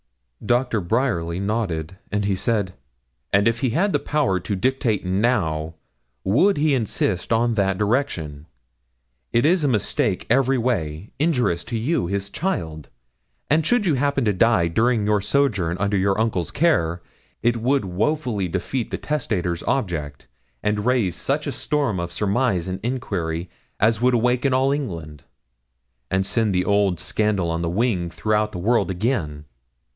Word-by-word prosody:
Doctor 120 -1 +1
Bryerly 90 -5 0
nodded, 95 -5 -2
and 105 -1 0
he 100 -1 +1
said 100 -2 0 0.6
'And 100 +2 +4
if 115 0 +1
he 130 - +1
had 190 - +1
the - - +2
power 140 -11 0
to 100 +4 -3
dictate 115 -1 0
now, 90 -6 0 0.5
would 145 - +3
he 150 0 +2
insist 105 -6 -1
on 115 +1 +2
that 95 -3 +1
direction? 90 - -1 0.8
It 120 +3 +2
is 170 +1 +3
a - - +3
mistake 110 -7 0
every 135 +1 +3
way, 100 -8 -2
injurious 125 - +1
to 115 - -3
you, 125 - 0
his 100 +1 -3
child; 80 - -3 0.6
and 160 +2 +4
should 220 +7 +2
you 170 - +3
happen 140 -1 +1
to 105 - +2
die 105 -3 +3
during 110 +5 +1
your 105 -1 +2
sojourn 105 -8 +1
under 100 +1 0
your 95 +1 +1
uncle's 110 -7 0
care, 90 - +1 0.4
it 120 0 +2
would 130 +1 +1
woefully 105 - -1
defeat 100 +8 -3
the - - -3
testator's 95 - -2
object, 80 - -2 0.4
and 105 +2 0
raise 120 -9 +2
such - - -1
a - - -2
storm 140 -10 -1
of 85 0 -4
surmise 100 0 0
and 95 0 -3
inquiry 95 -9 -3 0.3
as 110 +1 +2
would 125 0 +4
awaken 125 +3 +2
all 135 +1 +2
England, 85 - -4 0.8
and 95 0 +1
send 110 -1 +1
the 90 0 +1
old 100 -4 +2
scandal 100 -5 0
on 85 0 -2
the 85 - -1
wing 95 -3 0
through 105 +6 0
the 95 - -6
world 115 +6 +1
again.' 90 - -2
105 Hz, 155 wpm, -22 LUFS, 90-125 Hz, 0.8 s, And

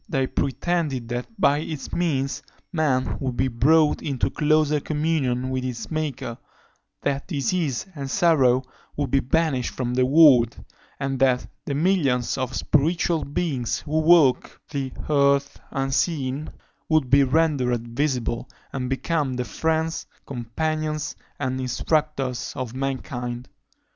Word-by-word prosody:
They 135 -6 +1
pretended 140 -2 -1
that 120 +1 -3
by 145 -6 +4
its 155 -2 -6
means 140 -6 0 0.3
man 140 -6 +1
would 130 -3 -3
be 130 - +2
brought 150 +6 +3
into 135 -5 -1
closer 150 -1 +2
communion 145 -5 -1
with 130 -1 -1
his 115 -4 -5
Maker; 145 -7 -3 0.6
that 140 0 -1
disease 150 -3 -1
and 140 -3 -5
sorrow 130 -4 +3 0.3
would 145 -4 -1
be 135 - +4
banished 135 -2 +1
from 125 -1 -2
the 125 0 +2
world; 135 -6 +6 0.4
and 135 -1 -2
that 130 -2 +3 0.2
"the 140 - -2
millions 145 -8 +2
of 130 -1 -3
spiritual 165 +2 +1
beings 140 -5 -2
who 155 +1 -1
walk 155 -5 +4
the 135 -3 -3 0.2
earth 140 -1 +2
unseen" 135 +1 -1 0.4
would 155 -6 +2
be 140 +1 +7
rendered 130 -5 +1
visible, 125 -2 -1 0.2
and 125 -2 -3
become 135 0 -1
the 125 0 -2
friends, 160 +2 -1 0.2
companions, 155 +5 -3 0.2
and 130 -1 -2
instructors 135 0 -1
of 130 -4 -4
mankind. 130 -2 -4
135 Hz, 130 wpm, -24 LUFS, 130-155 Hz, 0.6 s, be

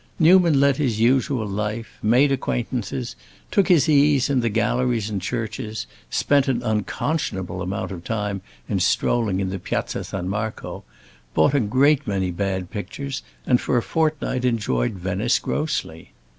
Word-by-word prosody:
Newman 170 -3 +5
led 140 -1 +4
his 125 -8 0
usual 125 0 +2
life, 105 +3 -4
made 125 +6 +4
acquaintances, 125 -2 -2 0.4
took 200 - +3
his 170 -8 +4
ease 145 -2 +4
in 135 - +3
the 115 -1 +1
galleries 115 0 0
and 100 -3 -2
churches, 110 +1 -4 0.2
spent 140 -1 +2
an 125 -2 0
unconscionable 105 - -2
amount 100 +3 -3
of 85 -3 -7
time 105 -3 -2 0.3
in - - 0
strolling 110 -6 +1
in 95 -1 -1
the 95 - -4
Piazza - - -3
San 90 -2 -5
Marco, 105 +3 -4 0.5
bought 80 - +4
a 140 - +4
great 135 +6 +3
many 95 -3 0
bad 95 0 -2
pictures, 135 +6 -5 0.2
and 125 - +3
for - - +1
a 120 - +1
fortnight 155 -5 0
enjoyed 105 - 0
Venice 95 +6 0
grossly. 150 - -3
115 Hz, 150 wpm, -23 LUFS, 100-135 Hz, 0.5 s, Newman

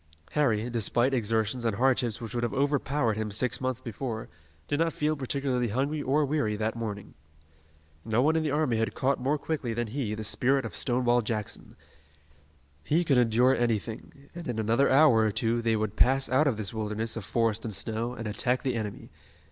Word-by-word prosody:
Harry, 115 -7 +1
despite 120 +2 +1
exertions 115 0 0
and 115 -3 0
hardships 125 -1 +1
which 115 -1 -7
would 120 - -1
have 120 -1 -2
overpowered 140 -3 +1
him 110 -1 -2
six 120 +6 -1
months 130 -2 -1
before, 115 -1 -5 0.4
did 145 - -1
not 165 -1 +1
feel 150 +1 0
particularly 130 -2 -1
hungry 140 +7 -1
or 145 +2 +2
weary 135 -7 0
that 110 +2 -2
morning. 105 -3 -5 0.9
No 110 +1 0
one 155 +3 +3
in 160 - +2
the 155 - -1
army 145 -5 +1
had 115 0 -1
caught 135 +1 +1
more 140 +4 +1
quickly 140 -7 -3
than 120 +1 -1
he 115 -3 -2
the 110 - -5
spirit 130 +5 +1
of 100 -7 -6
Stonewall 120 +5 +2
Jackson. 105 -2 -4 1.1
He 165 - +2
could 135 -6 +3
endure 120 +3 +4
anything, 115 +4 -3
and 175 -1 -7
in 120 -3 -3
another 115 +5 +2
hour 140 -3 +6
or 110 -1 +3
two 115 +3 0
they 115 -1 +1
would 110 -1 -2
pass 135 +3 +3
out 140 +4 +3
of 125 -6 +1
this 110 +1 -4
wilderness 110 +1 -2
of 115 - -5
forest 115 +1 0
and 115 - -4
snow, 110 +4 -3
and 115 -1 -5
attack 125 +4 0
the 130 -2 0
enemy. 110 -3 -5
120 Hz, 195 wpm, -28 LUFS, 110-135 Hz, 1.1 s, hour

